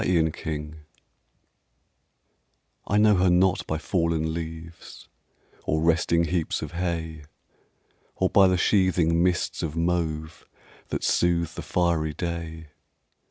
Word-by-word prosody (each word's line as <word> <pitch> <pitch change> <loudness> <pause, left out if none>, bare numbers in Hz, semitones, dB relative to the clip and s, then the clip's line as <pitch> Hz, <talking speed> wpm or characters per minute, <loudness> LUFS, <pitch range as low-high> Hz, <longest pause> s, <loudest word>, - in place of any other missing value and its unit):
AUTUMN 80 -3 -1 2.1
I 105 - +1
know 105 -1 +5
her 90 0 +3
not 90 +1 +2
by 80 - -1
fallen 80 -2 -1
leaves 80 0 -8 0.6
Or 80 - 0
resting 85 0 +2
heaps 85 0 -1
of - - -6
hay; 80 -3 -4 0.9
Or 95 - +1
by 95 +1 +5
the 90 0 +2
sheathing 85 -3 +2
mists 90 0 0
of 80 -2 -3
mauve 80 -2 -2 0.4
That - - -4
soothe 85 -1 +1
the - - -6
fiery 80 -4 0
day. 80 -2 -5
85 Hz, 115 wpm, -25 LUFS, 80-90 Hz, 2.1 s, know